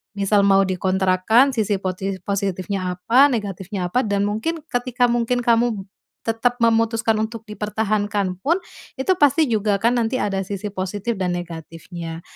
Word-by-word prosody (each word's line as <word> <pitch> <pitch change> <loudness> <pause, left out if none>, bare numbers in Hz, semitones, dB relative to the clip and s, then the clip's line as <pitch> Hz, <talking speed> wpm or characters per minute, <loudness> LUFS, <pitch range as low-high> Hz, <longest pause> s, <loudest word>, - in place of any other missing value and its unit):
Misal 200 0 +2
mau 195 0 +5
dikontrakkan 190 +6 +2
sisi 210 -4 0
poti 190 +1 -3
positifnya 190 -1 -2
apa, 240 +9 +5
negatifnya 195 -5 -3
apa, 250 +8 +2
dan 200 -1 0
mungkin 220 +11 -2
ketika 245 0 +1
mungkin 240 +1 0
kamu 230 -3 +2 0.4
tetap 240 +2 0
memutuskan 225 -1 +2
untuk 225 0 -5
dipertahankan 210 -2 -1
pun, 335 +6 +2 0.4
itu 320 +8 +2
pasti 295 +1 +4
juga 210 -2 +1
kan 240 +2 +2
nanti 240 +2 0
ada 195 -1 -1
sisi 200 +1 -4
positif 205 +4 -3
dan 180 -2 -1
negatifnya. 165 -1 -7
205 Hz, 140 wpm, -21 LUFS, 190-230 Hz, 0.4 s, mau